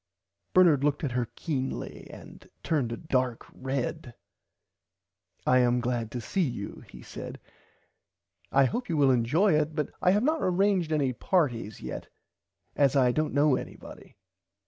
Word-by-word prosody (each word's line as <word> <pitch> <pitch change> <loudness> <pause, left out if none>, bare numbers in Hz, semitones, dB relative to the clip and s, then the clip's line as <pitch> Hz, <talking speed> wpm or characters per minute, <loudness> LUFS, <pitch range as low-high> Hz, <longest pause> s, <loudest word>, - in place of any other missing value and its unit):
Bernard 170 -7 +6
looked 145 +1 +1
at 140 - -1
her 120 -1 -1
keenly 135 -5 -4
and - - -13
turned 140 -8 0
a 115 - -3
dark 130 -7 -1
red. 130 0 -4 1.3
I 130 - +5
am 125 0 +3
glad 120 -2 -2
to 120 - -5
see 185 - -2
you 120 - -4
he 60 0 -12
said - - -8 1.1
I 135 0 +5
hope 240 - -3
you 165 - 0
will 140 -2 +5
enjoy 145 - +3
it 155 0 +1
but 150 -2 -2
I - - +4
have 205 +4 +3
not 315 +3 +1
arranged 185 -2 +2
any 140 -4 +1
partys 120 - -1
yet - - -6 0.7
as 140 -1 +3
I 130 -3 +4
dont 155 +4 0
know 145 -1 +4
anybody. - - -9
140 Hz, 150 wpm, -28 LUFS, 125-165 Hz, 1.3 s, Bernard